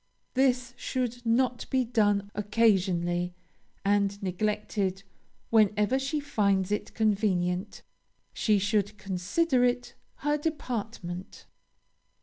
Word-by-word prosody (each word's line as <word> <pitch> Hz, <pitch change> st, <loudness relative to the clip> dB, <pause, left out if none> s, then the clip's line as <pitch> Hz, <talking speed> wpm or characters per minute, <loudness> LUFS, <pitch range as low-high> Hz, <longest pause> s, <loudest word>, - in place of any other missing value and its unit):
This 250 Hz, -2 st, +2 dB
should 245 Hz, -1 st, -3 dB
not 245 Hz, +1 st, +1 dB
be 260 Hz, -1 st, +2 dB
done 205 Hz, -4 st, +1 dB
occasionally, 185 Hz, -5 st, +1 dB, 0.5 s
and 200 Hz, 0 st, +2 dB
neglected 195 Hz, 0 st, -1 dB, 0.5 s
whenever 215 Hz, +3 st, +3 dB
she 275 Hz, +3 st, -1 dB
finds 200 Hz, -9 st, +1 dB
it 210 Hz, -, -2 dB
convenient 200 Hz, -3 st, 0 dB, 0.5 s
she 215 Hz, -2 st, +2 dB
should 205 Hz, +1 st, 0 dB
consider 210 Hz, -, +1 dB
it 245 Hz, 0 st, 0 dB, 0.3 s
her 295 Hz, 0 st, +2 dB
department. 225 Hz, -, -4 dB
210 Hz, 95 wpm, -28 LUFS, 195-245 Hz, 0.5 s, whenever